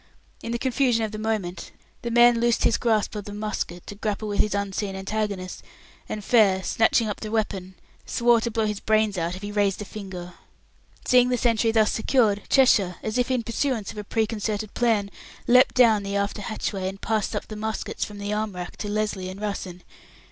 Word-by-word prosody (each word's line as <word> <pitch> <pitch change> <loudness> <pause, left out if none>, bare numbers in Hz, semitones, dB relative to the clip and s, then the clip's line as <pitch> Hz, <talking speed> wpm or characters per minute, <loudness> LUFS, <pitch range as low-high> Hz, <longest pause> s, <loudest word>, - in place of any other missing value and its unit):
In 230 - -5
the 235 - 0
confusion 250 -2 +1
of 215 - -6
the 215 - -6
moment 205 -6 -3 0.3
the 235 - -3
man 240 0 +5
loosed 235 0 +2
his - - +3
grip 220 -3 +1
of 210 -2 -5
the 205 - -7
musket 210 -5 -4
to - - -7
grapple 210 +1 -3
with 205 - -3
his 210 -1 +2
unseen 200 0 -2
antagonist, 195 -1 -3 0.5
and 210 -2 -5
Fair, 200 -6 +4
snatching 225 +2 +2
up 210 - -4
the 215 - -5
weapon, 195 -4 -2 0.3
swore 235 -1 +3
to 235 - -1
blow 225 0 0
out 215 - +1
his 210 -1 -3
brains 215 -1 +2
if 175 +2 -3
he 205 - -4
raised 205 -2 +1
a 210 - -5
finger. 190 -4 -8 0.7
Seeing 250 0 +5
the 250 - +1
sentry 230 -1 +2
thus 220 -1 +3
secured, 220 -3 +2
Cheshire, 205 -9 +4
as 220 +3 -1
if 245 - +1
in 255 -2 0
pursuance 230 -2 -1
of - - -13
a - - -4
preconcerted 215 -1 -2
plan, 220 -4 +1 0.3
leapt 250 +2 +5
down 230 -5 +5
the 200 0 -4
after 200 +1 -1
hatchway, 200 -2 -3
and 195 +1 -9
passed 220 -1 -1
up - - -3
the 215 - -7
muskets 220 +1 -3
from 210 - -6
the 205 +1 -3
arm 210 -1 -2
racks 180 0 -7
to 210 - -4
Lesly 205 -3 -2
and 190 +1 -8
Russen. 195 -4 -5
215 Hz, 205 wpm, -25 LUFS, 200-225 Hz, 0.7 s, man